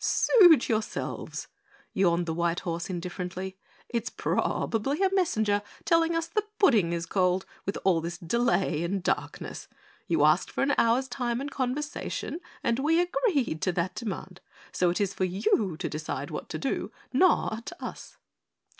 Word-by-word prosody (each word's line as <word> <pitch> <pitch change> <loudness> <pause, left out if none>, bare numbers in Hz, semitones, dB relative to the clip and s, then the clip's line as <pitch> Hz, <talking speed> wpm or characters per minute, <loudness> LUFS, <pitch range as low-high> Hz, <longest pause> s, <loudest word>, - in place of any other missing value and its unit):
"Suit 350 - +6
yourselves," 220 -2 -3 0.5
yawned 175 -2 +2
the 165 - -2
white 170 +1 0
horse 170 -1 -3
indifferently. 180 +1 -4 0.3
"It's 235 -1 -2
probably 270 - 0
a 385 0 +2
messenger 220 - +2 0.2
telling 330 0 +3
us 330 0 0
the 335 +6 0 0.2
pudding 220 - +4
is 170 0 -2
cold 185 0 +1 0.2
with 195 - -1
all 180 -4 +3
this 170 +1 -4
delay 185 -3 +1
and 185 +2 -2
darkness. - - -3 0.4
You 160 -3 +3
asked 155 +3 +3
for - - -1
an 285 +1 +2
hour's 240 +3 +3
time 245 -2 -2
and 280 +1 -4
conversation 280 +5 -3 0.2
and 235 +1 +1
we 320 +4 +3
agreed 355 - +1
to 185 - +1
that 170 +1 -1
demand, 190 -5 -6 0.3
so 180 - +2
it 175 - -1
is 200 -2 0
for 185 - 0
you 185 -1 +1
to - - -3
decide 155 +1 -4
what - - -6
to - - -3
do, - - -2 0.2
not 255 -7 +2
us." - - -8
205 Hz, 155 wpm, -28 LUFS, 175-275 Hz, 0.5 s, Suit